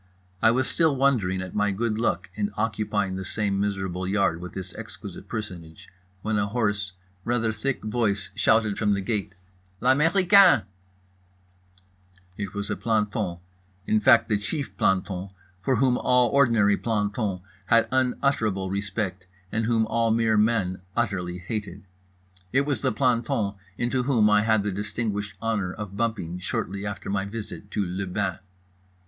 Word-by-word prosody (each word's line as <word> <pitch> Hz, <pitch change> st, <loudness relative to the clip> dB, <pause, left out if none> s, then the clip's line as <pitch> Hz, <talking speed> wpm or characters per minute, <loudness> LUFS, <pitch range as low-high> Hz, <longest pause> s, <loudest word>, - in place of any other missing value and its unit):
I -, -, +6 dB
was 130 Hz, +3 st, +2 dB
still 160 Hz, -4 st, +2 dB
wondering 110 Hz, -9 st, +2 dB
at 90 Hz, -, -8 dB
my 105 Hz, 0 st, +2 dB
good 110 Hz, +2 st, -1 dB
luck 115 Hz, -, -1 dB
in 205 Hz, -1 st, -1 dB
occupying 105 Hz, -3 st, -1 dB
the 95 Hz, -, -4 dB
same 100 Hz, 0 st, -1 dB
miserable 95 Hz, -2 st, -2 dB
yard 95 Hz, -4 st, +1 dB
with 90 Hz, -, -7 dB
this 95 Hz, -2 st, -6 dB
exquisite -, -, -9 dB
personage 90 Hz, -7 st, -7 dB, 0.3 s
when 110 Hz, -1 st, 0 dB
a 100 Hz, -, +1 dB
hoarse, 105 Hz, -3 st, -1 dB, 0.3 s
rather 115 Hz, -2 st, +1 dB
thick 135 Hz, +4 st, -2 dB
voice 105 Hz, -3 st, -1 dB
shouted 110 Hz, -2 st, +2 dB
from 105 Hz, -2 st, +2 dB
the 100 Hz, -, -2 dB
gate: 100 Hz, -1 st, -2 dB, 0.4 s
"L'américain!" 175 Hz, -, +5 dB, 1.7 s
It 100 Hz, -1 st, -5 dB
was 100 Hz, 0 st, -3 dB
a -, -, 0 dB
planton, 105 Hz, -5 st, -1 dB, 0.5 s
in 110 Hz, -, +3 dB
fact 115 Hz, +1 st, +5 dB
the 105 Hz, -3 st, +1 dB
chief 135 Hz, -, -4 dB
planton 95 Hz, 0 st, 0 dB, 0.3 s
for 130 Hz, +6 st, +1 dB
whom 125 Hz, 0 st, +2 dB
all 125 Hz, -1 st, +3 dB
ordinary 115 Hz, -7 st, +4 dB
plantons 105 Hz, -3 st, -1 dB, 0.3 s
had 115 Hz, +2 st, +4 dB
unutterable 125 Hz, -7 st, +1 dB
respect 95 Hz, -1 st, -3 dB, 0.2 s
and 115 Hz, 0 st, 0 dB
whom 115 Hz, -1 st, +2 dB
all 115 Hz, +1 st, +1 dB
mere 110 Hz, 0 st, +2 dB
men 105 Hz, -4 st, +1 dB, 0.2 s
unutterably 95 Hz, -6 st, -1 dB
hated. 100 Hz, +1 st, -5 dB, 0.7 s
It 135 Hz, -, +3 dB
was 140 Hz, -6 st, -1 dB
the -, -, +1 dB
planton 115 Hz, -4 st, +1 dB, 0.2 s
into 125 Hz, +2 st, 0 dB
whom 120 Hz, -5 st, +3 dB
I 105 Hz, -, +6 dB
had -, -, -2 dB
had 110 Hz, -2 st, +3 dB
the 105 Hz, -, -1 dB
distinguished 105 Hz, +1 st, -3 dB
honour 105 Hz, -5 st, 0 dB
of 100 Hz, 0 st, -7 dB
bumping 100 Hz, -6 st, -2 dB
shortly 100 Hz, +2 st, -3 dB
after 100 Hz, -3 st, -6 dB
my 100 Hz, -1 st, 0 dB
visit 105 Hz, -1 st, -7 dB
to 105 Hz, -, -1 dB
le 95 Hz, +2 st, -3 dB
bain. 95 Hz, -1 st, -2 dB
105 Hz, 155 wpm, -25 LUFS, 95-115 Hz, 1.7 s, I